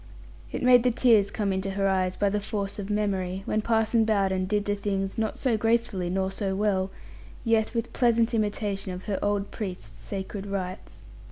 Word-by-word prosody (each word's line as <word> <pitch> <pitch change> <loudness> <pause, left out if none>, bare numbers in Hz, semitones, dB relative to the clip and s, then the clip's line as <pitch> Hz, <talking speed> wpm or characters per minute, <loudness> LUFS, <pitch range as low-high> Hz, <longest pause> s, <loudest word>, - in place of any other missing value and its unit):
It - - -3
made 250 -1 +7
the 250 - +3
tears 225 -4 +4
come 205 -3 -1
into 190 +1 -2
her 195 0 0
eyes, 185 -1 +1
by 205 - +2
the 205 +1 0
force 200 0 -3
of 200 0 -5
memory, 195 -3 -1
when 215 - 0
Parson 225 0 +2
Bowden 195 -4 +1
did 205 +1 0
the 205 - +1
things, 195 -1 -2
not 220 -1 -1
so 245 -5 +1
gracefully 225 -5 +1
nor 190 +1 0
so 195 -1 -2
well, 195 -2 +1 0.6
yet 225 0 +2
with 230 0 -2
pleasant 235 -2 +3
imitation 205 -3 -1
of 180 +1 -7
her 200 -2 -2
old 205 -1 0
Priest's 180 - -6
sacred 195 - -5
rites. 190 -1 -5
200 Hz, 185 wpm, -27 LUFS, 190-220 Hz, 0.6 s, made